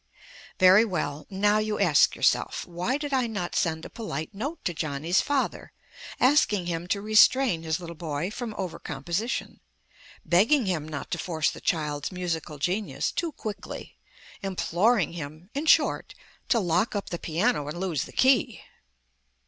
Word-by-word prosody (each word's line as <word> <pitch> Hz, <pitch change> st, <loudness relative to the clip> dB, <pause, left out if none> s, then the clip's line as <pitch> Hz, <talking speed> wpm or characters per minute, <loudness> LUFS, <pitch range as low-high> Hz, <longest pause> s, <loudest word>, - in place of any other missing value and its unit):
Very 185 Hz, +2 st, +7 dB
well. 155 Hz, -8 st, -3 dB
Now, 205 Hz, +2 st, +2 dB
you 215 Hz, 0 st, -2 dB
ask 175 Hz, -7 st, +4 dB
yourself, -, -, +1 dB
why 180 Hz, +10 st, -2 dB
did 290 Hz, -1 st, -4 dB
I 255 Hz, -3 st, +2 dB
not 200 Hz, -6 st, -4 dB
send 160 Hz, -4 st, 0 dB
a -, -, -8 dB
polite 160 Hz, -8 st, -5 dB
note 280 Hz, +11 st, -5 dB
to 175 Hz, -, 0 dB
Johnny's 155 Hz, +3 st, 0 dB
father 285 Hz, -2 st, -2 dB, 0.5 s
asking 250 Hz, -, +3 dB
him 170 Hz, 0 st, -3 dB
to 200 Hz, +2 st, -1 dB
restrain 215 Hz, -1 st, +4 dB
his 160 Hz, +1 st, -2 dB
little 170 Hz, -1 st, -8 dB
boy 160 Hz, +2 st, -3 dB
from 230 Hz, -2 st, -5 dB
over 185 Hz, -4 st, -4 dB
composition, 170 Hz, -, -3 dB, 0.7 s
begging 225 Hz, +9 st, +4 dB
him 165 Hz, -5 st, -2 dB
not 145 Hz, -2 st, -6 dB
to -, -, -2 dB
force 160 Hz, -4 st, 0 dB
the -, -, -10 dB
child's 150 Hz, -2 st, -1 dB
musical 170 Hz, -4 st, -4 dB
genius 175 Hz, -2 st, -1 dB
too 335 Hz, -1 st, -2 dB
quickly, 215 Hz, -5 st, -7 dB, 0.5 s
imploring 195 Hz, 0 st, +1 dB
him 155 Hz, +4 st, -8 dB
(in 290 Hz, +3 st, -3 dB
short) -, -, +3 dB, 0.3 s
to 235 Hz, -, +4 dB
lock 180 Hz, +4 st, +1 dB
up 200 Hz, -, -3 dB
the 175 Hz, -, -3 dB
piano 170 Hz, 0 st, 0 dB
and 155 Hz, +4 st, -5 dB
lose 175 Hz, -7 st, -1 dB
the -, -, -12 dB
key? 260 Hz, -4 st, +2 dB
180 Hz, 155 wpm, -26 LUFS, 160-220 Hz, 0.7 s, Very